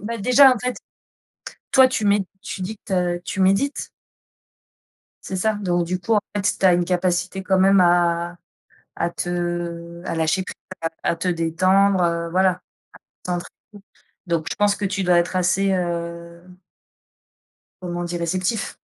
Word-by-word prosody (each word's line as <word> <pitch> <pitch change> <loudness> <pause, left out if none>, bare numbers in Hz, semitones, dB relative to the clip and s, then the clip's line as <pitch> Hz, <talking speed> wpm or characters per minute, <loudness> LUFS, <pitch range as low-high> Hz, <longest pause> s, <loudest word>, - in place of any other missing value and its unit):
Bah, 230 +1 -4
déjà 255 +5 +6
en - - -5
fait 250 +2 -3 1.0
toi 260 -1 +7
tu 220 -4 -2
mets, 200 -1 +3 0.2
tu 190 - -6
dis 205 +4 -4
que, - - -62
tu 195 - -4
as 175 -1 0
tu 195 - -4
médites. 195 +10 +1 1.4
C'est 190 - -4
ça. 220 +3 +1
Donc 175 -4 0
du 180 +2 -2
coup 200 +5 0
en 210 - +4
fait, 200 -1 0
tu - - -3
as 180 - +6
une 175 0 +1
capacité 180 +1 -1
quand 190 0 +1
même 195 0 +5
à 175 0 +2 0.6
à 170 - -1
te 175 -1 -4
à - - -3
lâcher 160 +4 +1
prise, - - -9 0.5
à 170 - +2
te 175 +2 -3
détendre, 185 +3 +2
heu, 170 -1 0
voilà. 185 +1 +3
À 180 0 -7 0.6
te - - -7 0.4
concentrer, 200 0 -15 0.4
donc 165 -2 -1
je - - -4
pense 205 -1 +2
que 200 0 -3
tu 195 0 -2
dois 175 -1 +4
être 175 +2 0
assez 190 +2 +2
heu 170 -1 -4 1.4
comment 175 -1 -4
dire, 175 0 -4
réceptif? 185 +6 -2
180 Hz, 170 wpm, -22 LUFS, 175-195 Hz, 1.4 s, toi